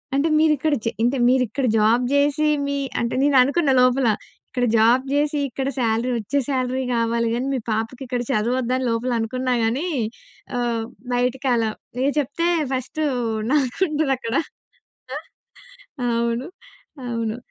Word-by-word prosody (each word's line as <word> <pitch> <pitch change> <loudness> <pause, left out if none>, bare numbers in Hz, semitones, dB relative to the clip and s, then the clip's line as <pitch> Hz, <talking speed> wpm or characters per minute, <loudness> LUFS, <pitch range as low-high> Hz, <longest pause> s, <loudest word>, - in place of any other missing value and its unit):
అంటే 280 +4 +2
మీరిక్కడ 310 -1 +2
జే 230 - +1
అంటే 255 +3 +2
మీరిక్కడ 255 +1 +1
జాబ్ 225 +4 +3
జేసి, 290 +2 +2 0.2
మీ 280 - -1 0.2
అంటే 235 0 -1
నేననుకున్న 280 +2 +4
లోపల 255 0 +3 0.4
ఇక్కడ 250 -2 0
జాబ్ 235 +4 +4
జేసి 295 0 +1
ఇక్కడ 265 +3 -2
సాలరీ 230 +1 +1
వచ్చే 230 +6 -2
సాలరీ 260 -1 0
కావాలి 230 0 +1
గాని, 245 +3 -1
మీ - - -1
పాపకి 225 +4 -2
ఇక్కడ 245 -1 -2
చదువొద్దా? 245 +3 0
అని 260 - -2
లోపల 230 +2 -1
అనుకున్నా 255 +3 -1
గానీ, 260 +10 -1 0.7
ఆహ్, 235 -2 -1 0.3
బయటకి 250 +2 0
అలా 225 -1 +1 0.4
ఎ - - +3
చెప్తే 295 +5 -1 0.3
ఫస్ట్ 260 +4 -3 0.5
నాకుంటదక్కడ 285 -4 0 1.7
అవును. 235 +3 0 0.6
అవును. 230 -1 -2
255 Hz, 125 wpm, -22 LUFS, 235-275 Hz, 1.7 s, నేననుకున్న